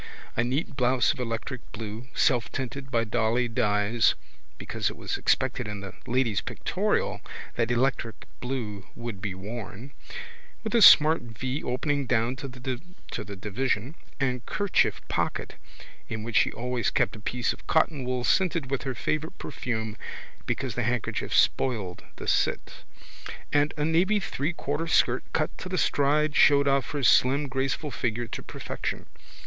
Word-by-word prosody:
A 120 - +2
neat 135 +5 -1
blouse 125 -1 +3
of - - -12
electric 120 +1 -3
blue 110 +2 -6
selftinted 130 +1 0
by 115 -3 +2
dolly 115 +2 +1
dyes 105 0 +2 0.4
(because - - -2
it - - -9
was - - -3
expected 125 -3 +1
in 105 -1 -5
the 100 -1 -7
Lady's 120 -3 +1
Pictorial - - -1 0.3
that 115 -1 0
electric 120 -2 0
blue 115 -6 -4
would 115 -5 -6
be 100 -3 -3
worn) 105 +5 -7 0.7
with 220 - -3
a 235 - +5
smart 160 -4 +9
vee 125 +4 -4
opening 140 +2 -1
down 120 +1 +2
to 140 - -5
the 130 - -6
division 110 +5 -1 0.3
and 125 -3 0
kerchief 205 -2 +1
pocket - - -2 0.6
(in 110 -1 -4
which 115 -1 0
she - - +4
always 125 +1 -1
kept - - +1
a - - -9
piece 120 +3 -1
of - - -16
cottonwool 130 -6 +1
scented 165 -2 +2
with 135 - 0
her 135 -2 -2
favourite 155 +8 -2
perfume 110 -3 -3 0.5
because 130 -4 -1
the 120 - -1
handkerchief 120 0 -1
spoiled 105 -9 +1
the - - -8
sit) - - 0 0.7
and 145 0 +3
a 150 - +1
navy 180 +6 +3
threequarter 155 -1 -2
skirt 125 -4 +3
cut 155 - 0
to 185 - -6
the 185 - -1
stride 150 0 +2
showed 140 -1 +6
off 140 -1 +2
her 145 -2 -3
slim 135 +6 +5
graceful 135 +3 -1
figure 120 0 -1
to 115 - -6
perfection. - - -5
125 Hz, 150 wpm, -27 LUFS, 115-140 Hz, 0.7 s, smart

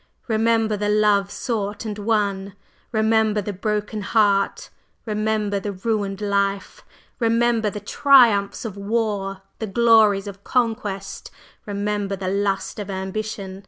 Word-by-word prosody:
Remember 225 -1 +2
the 205 0 -1
love 210 -2 +3
sought 210 -2 -3
and 210 -1 -5
won! 200 -2 -1 0.4
remember 220 -1 +2
the 205 0 -4
broken 210 +2 -2
heart! 200 -1 +1 0.3
remember 215 -2 -1
the 200 +1 -4
ruined 200 0 -2
life! 200 -1 -1 0.4
Remember 230 -1 +2
the 210 - -6
triumphs 230 -4 +4
of 210 -4 -5
war! 200 -2 -2 0.2
the 220 - -3
glories 215 -2 +4
of 200 -1 -9
conquest! 220 -6 -2 0.4
Remember 205 0 -2
the 185 -1 -4
lust 200 +2 -1
of 205 - -6
ambition! 190 0 -5
210 Hz, 125 wpm, -22 LUFS, 200-220 Hz, 0.4 s, triumphs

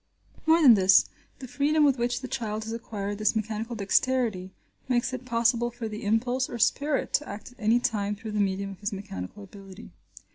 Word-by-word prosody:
More 325 +1 +5
than 255 -5 +9
this, 190 -2 +5 0.3
the 260 - -9
freedom 285 +5 +1
with 275 -3 +3
which 245 +1 -1
the 260 - -5
child 220 -5 -3
has 225 +1 -5
acquired 205 -3 -5
this 215 +1 +2
mechanical 220 +2 -3
dexterity 215 -2 0 0.4
makes 250 0 0
it 255 0 -5
possible 235 0 +1
for 240 -1 -6
the 215 0 -7
impulse 245 +5 0
or 240 - -5
spirit 280 +5 0
to 295 - 0
act 210 +4 -8
at 250 - -22
any 225 +2 +3
time 210 -4 -1
through 220 +1 -8
the 210 - -2
medium 195 0 -1
of 195 - -11
his 205 +1 -3
mechanical 195 - -7
ability. 195 +1 -12
225 Hz, 195 wpm, -27 LUFS, 205-250 Hz, 0.4 s, than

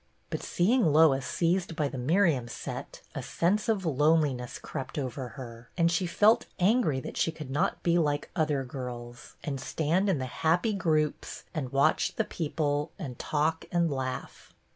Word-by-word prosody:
But - - -2
see 180 +7 +1
ing 235 - +4
Lois 145 -3 +5
seized 175 0 0
by 150 -2 +1
the 135 - -5
Miriam 155 -2 +2
set, - - -7
a - - -4
sense 205 +6 0
of 200 -4 +1
loneliness 145 -4 +2
crept 135 +2 -6
over 130 -2 -3
her, 115 -2 -9
and 170 -1 +3
she 175 +1 +1
felt 215 +7 +4
angry 185 - +3
that - - -7
she 165 - +2
could 155 -4 -8
not 145 - 0
be 175 0 +3
like 145 -2 0
other 150 -5 +1
girls, 125 0 -7
and 140 -3 -3
stand 165 +8 +1
in 185 - +2
the 130 - -2 0.2
happy 175 +7 +3
groups, 155 -6 0
and 135 -6 -3
watch 140 +3 +2
the - - +1
people, 150 -2 -1
and 135 - -7
talk 160 +2 0
and 170 -2 +2
laugh. 130 -2 -5
155 Hz, 170 wpm, -29 LUFS, 135-170 Hz, 0.2 s, Lois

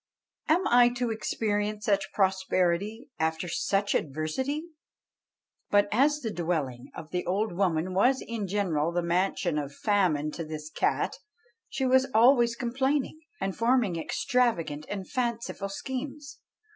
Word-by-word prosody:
Am 345 +4 +3
I 245 0 +6
to 245 -2 0
experience 210 -1 -2
such 200 -2 +1
prosperity 190 +3 0
after 160 +2 -1
such 195 +4 0
adversity?" 160 - -2 1.1
But 205 0 +4
as 290 +6 +3
the 225 - -3
dwelling 155 -8 -2
of 155 - -9
the 180 0 -1
old 205 +5 0
woman 180 -1 0
was 250 +8 +3
in 225 -4 -4
general 175 -5 0
the 175 0 -1
mansion 175 -2 0
of 140 -1 -6
famine 175 -8 +1
to 165 - -5
this 155 -1 -7
cat, - - 0 0.5
she 270 0 -2
was 260 +1 +4
always 235 0 +5
complaining, 265 +5 -1 0.2
and 195 0 -2
forming 230 -5 +2
extravagant 165 - 0
and 195 -2 -4
fanciful 235 -5 -2
schemes. 270 +7 -6
205 Hz, 135 wpm, -28 LUFS, 170-245 Hz, 1.1 s, I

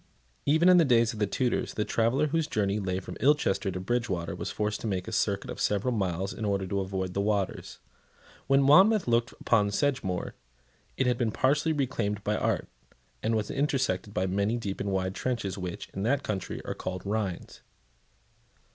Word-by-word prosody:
Even 160 +5 +4
in 180 -1 +8
the 170 - +6
days 120 -5 +3
of 110 - -8
the 105 - +2
Tudors, 125 +4 -1
the 105 - 0
traveller 115 +6 +2
whose 165 +1 0
journey 105 -5 0
lay 95 -2 -2
from 95 - -8
Ilchester 135 -9 +2
to 90 -1 -4
Bridgewater 95 -4 -2
was - - -4
forced 105 0 -2
to - - -3
make 95 -1 -2
a - - -5
circuit 100 -3 0
of - - -6
several 105 +5 +1
miles 95 -2 -1
in 110 - -7
order 100 -2 0
to 100 +2 -2
avoid 95 -1 -3
the 100 - 0
waters. 100 -2 -1 0.7
When 135 0 +4
Monmouth 190 - +6
looked 120 0 +2
upon 105 -3 +2
Sedgemoor, 100 -6 -1 0.6
it 130 - +2
had 125 -1 +1
been 120 -3 +1
partially 145 +8 +1
reclaimed 105 -8 -1
by 105 - 0
art, - - 0 0.5
and 115 - 0
was 105 -2 -1
intersected 135 -9 0
by 95 -1 0
many 100 +5 0
deep 100 -4 -4
and 100 - -2
wide 95 0 -1
trenches 115 -4 -2
which, 90 -3 -5
in 95 - -6
that 135 +7 +1
country, 100 -3 -4
are - - -3
called 95 0 -5
rhines. 100 -3 -3
105 Hz, 190 wpm, -28 LUFS, 95-130 Hz, 0.7 s, in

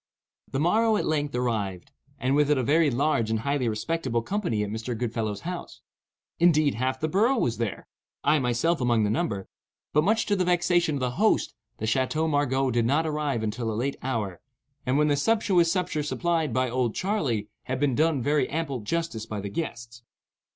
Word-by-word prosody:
The 135 - -1
morrow 215 +7 +3
at - - -1
length 145 -3 -1
arrived, 110 -2 -2 0.3
and 130 -1 0
with 150 0 +3
it 150 - +4
a 130 - +1
very 155 +4 +3
large 125 -3 +1
and 110 0 0
highly 140 -2 0
respectable 120 +1 -1
company 170 - -1
at 105 - -4
Mr. 115 +2 -4
Goodfellow's 110 -3 -2
house. 180 0 -6 0.6
Indeed, 155 -4 +4
half 130 +3 -1
the 155 - 0
borough 220 - +2
was 115 - 0
there,—I 120 +6 -2
myself 130 +6 +1
among 120 -3 +2
the 105 - +1
number,—but, 120 - -3
much 220 +5 +2
to 205 - +1
the 185 - +1
vexation 175 -3 +2
of 135 - -3
the 125 -1 0
host, 220 - +2 0.2
the 110 - -4
Chateau 130 +7 +1
Margaux 135 -3 +1
did 120 -1 +1
not 150 +5 +2
arrive 150 -6 -1
until 110 +1 -2
a - - -3
late 135 +4 -1
hour, 110 -9 -3 0.5
and 130 +2 +2
when 150 0 +3
the 145 - +3
sumptuous 180 0 +2
supper 180 -5 -1
supplied 165 +1 0
by 130 0 +1
"Old 125 -2 -1
Charley" 140 - -1 0.2
had 130 0 -2
been 145 -2 +2
done 155 -1 +2
very 145 -1 +1
ample 145 -4 -2
justice 115 -1 -3
by 105 -2 -4
the 100 0 -5
guests. 115 -3 -5
135 Hz, 185 wpm, -26 LUFS, 115-165 Hz, 0.6 s, it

